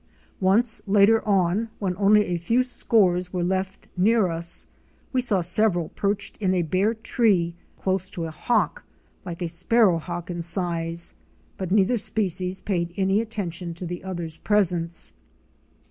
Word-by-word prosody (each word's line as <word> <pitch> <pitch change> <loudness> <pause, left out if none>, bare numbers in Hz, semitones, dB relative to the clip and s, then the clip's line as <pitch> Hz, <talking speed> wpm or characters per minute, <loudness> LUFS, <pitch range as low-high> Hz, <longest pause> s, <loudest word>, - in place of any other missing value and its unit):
Once 220 +5 +2
later 205 +3 +5
on, 195 +3 +1
when 185 -3 -2
only 210 +1 +4
a 175 - -2
few 230 +10 +1
scores 185 -8 +1
were 180 -2 -2
left 190 +1 -2
near 205 +1 +3
us, 170 0 0 0.5
we 255 - +2
saw 210 -7 +2
several 175 -1 +2
perched 200 0 -2
in 185 -3 0
a 175 - +1
bare 190 +7 +1
tree 210 -7 +1 0.2
close 190 -1 -1
to 170 - -5
a 160 - -5
Hawk, 225 +8 0 0.4
like 175 0 -5
a - - -1
Sparrow 180 +2 +3
Hawk 175 +1 -6
in 170 -1 -4
size, 170 -1 -1 0.4
but 190 -2 -5
neither 205 +5 +3
species 190 -3 -1
paid 175 -3 -2
any 195 +2 +2
attention 180 -6 -5
to 180 - -6
the 175 +1 -6
other's 175 -4 -5
presence. 175 -5 +1
185 Hz, 150 wpm, -24 LUFS, 175-210 Hz, 0.5 s, later